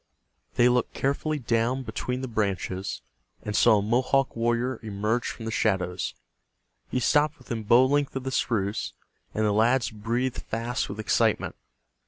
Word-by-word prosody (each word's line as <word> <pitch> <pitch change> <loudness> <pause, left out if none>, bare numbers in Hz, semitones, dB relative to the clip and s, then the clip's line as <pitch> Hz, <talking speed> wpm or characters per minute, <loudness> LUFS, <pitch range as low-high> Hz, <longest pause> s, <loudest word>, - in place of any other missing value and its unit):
They 120 - +5
looked 125 0 +1
carefully 145 +3 0
down 120 +1 0
between 125 0 -3
the 130 - -3
branches 100 -4 -2 0.4
and 105 - -3
saw 110 - +6
a - - +1
Mohawk 130 +5 +1
warrior 120 +2 0
emerge 110 +2 -1
from 115 - -6
the 110 - -3
shadows. 95 -5 0 0.7
He 125 - 0
stopped 150 +4 +2
within 120 -3 -5
bow 120 +4 +5
length 145 +1 +1
of 135 - -3
the 130 - -3
spruce, 105 -5 -1 0.4
and 110 - +1
the 105 - +3
lads 115 +1 +3
breathed 115 +4 -2
fast 115 +3 -3
with 100 +2 -6
excitement. 110 - +1
115 Hz, 155 wpm, -26 LUFS, 105-130 Hz, 0.7 s, saw